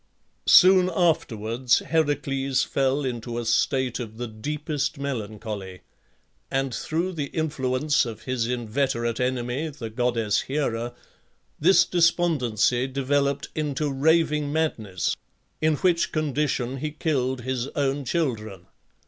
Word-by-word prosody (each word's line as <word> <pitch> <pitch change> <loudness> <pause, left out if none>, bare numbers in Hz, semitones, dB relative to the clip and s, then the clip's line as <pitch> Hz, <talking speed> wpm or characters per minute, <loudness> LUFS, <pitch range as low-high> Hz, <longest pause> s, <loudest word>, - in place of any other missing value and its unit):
Soon 185 0 +7
afterwards 120 - +1
Heracles 140 -4 0
fell 135 +1 0
into 120 -2 -4
a 120 - -3
state 125 +3 +1
of 110 -2 -7
the 120 - -3
deepest 145 +7 -3
melancholy, 105 - -5 0.7
and 135 -1 -1
through 170 +9 -2
the 145 -4 -3
influence 145 -2 0
of 115 -4 -7
his 125 -3 -1
inveterate 120 -1 -1
enemy, 125 +4 -1
the 115 -6 -7
goddess 115 -2 +1
Hera, 120 -4 -2 0.6
this 185 +5 +5
despondency 140 - +2
developed 140 +1 0
into 150 -1 -1
raving 150 +1 +2
madness, 110 - -1 0.5
in 155 0 +3
which 175 +1 +1
condition 145 -4 -1
he 155 +3 -3
killed 135 -5 -1
his 130 0 -2
own 140 0 0
children. 110 - -2
135 Hz, 115 wpm, -25 LUFS, 120-150 Hz, 0.7 s, Soon